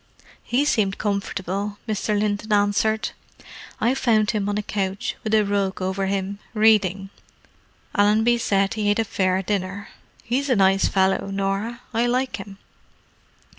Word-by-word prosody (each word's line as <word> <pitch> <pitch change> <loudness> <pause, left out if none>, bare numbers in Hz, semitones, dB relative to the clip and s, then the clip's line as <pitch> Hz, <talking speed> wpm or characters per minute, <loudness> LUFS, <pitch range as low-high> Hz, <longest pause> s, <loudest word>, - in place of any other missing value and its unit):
"He 265 +4 0
seemed 200 -8 +1
comfortable," 200 0 -3
Mr. 210 -1 0
Linton 210 +1 -1
answered. 210 +2 +2 0.7
"I 240 - +2
found 220 -5 +2
him 205 -2 -1
on 205 - -1
a 210 - -2
couch, 195 -2 -2
with 215 - -2
a 215 - +4
rug 200 -1 -1
over 190 +1 -1
him, 195 +1 -2 0.2
reading. 200 -3 +3 0.8
Allenby 220 +4 +3
said 195 -2 +1
he 215 -2 0
ate 205 - +2
a 225 - +2
fair 190 -3 0
dinner. 195 0 -3 0.3
He's 270 +5 -1
a 255 - +4
nice 195 -1 +4
fellow, 190 0 +1
Norah; 195 +5 -2
I 230 +2 +2
like 255 +2 0
him." 195 -1 -10
205 Hz, 145 wpm, -23 LUFS, 195-220 Hz, 0.8 s, a